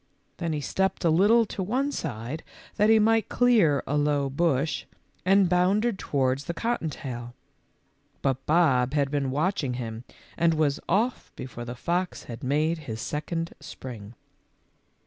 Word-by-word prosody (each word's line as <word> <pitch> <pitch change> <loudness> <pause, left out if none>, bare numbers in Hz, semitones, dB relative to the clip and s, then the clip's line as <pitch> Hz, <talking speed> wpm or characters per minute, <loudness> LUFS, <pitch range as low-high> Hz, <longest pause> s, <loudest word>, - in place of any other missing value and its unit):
Then 170 -2 -2
he 150 -1 -2
stepped 190 +5 -1
a 165 - +5
little 210 +8 +5
to 205 - -5
one 255 +9 0
side 120 - -4 0.4
that 210 0 +4
he 225 - +7
might 220 0 +3
clear 215 - +3
a 145 - -1
low 145 -2 +1
bush, 150 0 0 0.4
and 195 0 +5
bounded 195 +5 +2
towards 135 0 0
the 170 - -4
cotton 230 -6 -1
tail; 120 -4 -7 0.9
but 135 -1 0
Bob 150 -5 +3
had 140 -2 +1
been 140 -2 0
watching 145 -2 0
him 115 -2 -5 0.3
and 165 -1 +3
was 150 -2 +1
off 225 +7 0
before 120 -2 -7
the 120 +1 -6
fox 175 +7 -2
had 115 +1 -8
made 155 +5 +1
his 110 0 -4
second 165 +6 -3
spring. 125 -7 -9
155 Hz, 150 wpm, -26 LUFS, 130-190 Hz, 0.9 s, he